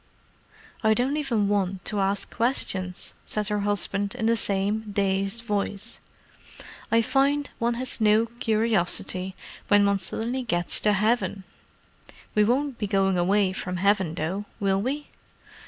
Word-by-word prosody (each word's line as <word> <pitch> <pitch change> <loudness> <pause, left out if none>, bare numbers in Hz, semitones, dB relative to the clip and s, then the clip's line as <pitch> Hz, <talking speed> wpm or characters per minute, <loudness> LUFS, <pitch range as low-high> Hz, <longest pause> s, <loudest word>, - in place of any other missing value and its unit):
"I 220 0 +4
don't 255 +5 +1
even 240 -9 0
want 195 -2 -1
to 210 - 0
ask 195 0 0
questions," 190 -7 -1
said 210 -2 -1
her 210 0 0
husband, 200 +1 -1
in 235 -3 -2
the 230 +1 +4
same 205 +1 0
dazed 195 +2 0
voice. 205 -2 -3 0.9
"I 230 0 +4
find 280 +4 +1
one 235 0 +1
has 250 -1 -5
no 215 +1 +5
curiosity, 215 -5 0 0.3
when 205 0 +5
one 200 -1 +2
suddenly 230 +8 -3
gets 175 -8 -1
to 210 - +3
heaven. 210 -1 +1 0.9
We 210 - +4
won't 260 +4 0
be 210 - -1
going 195 -1 +2
away 190 +1 +2
from 180 -1 -4
heaven, 190 -3 +2
though, 180 +6 -3
will 195 -1 +1
we?" 285 +6 -3
205 Hz, 140 wpm, -26 LUFS, 195-230 Hz, 0.9 s, no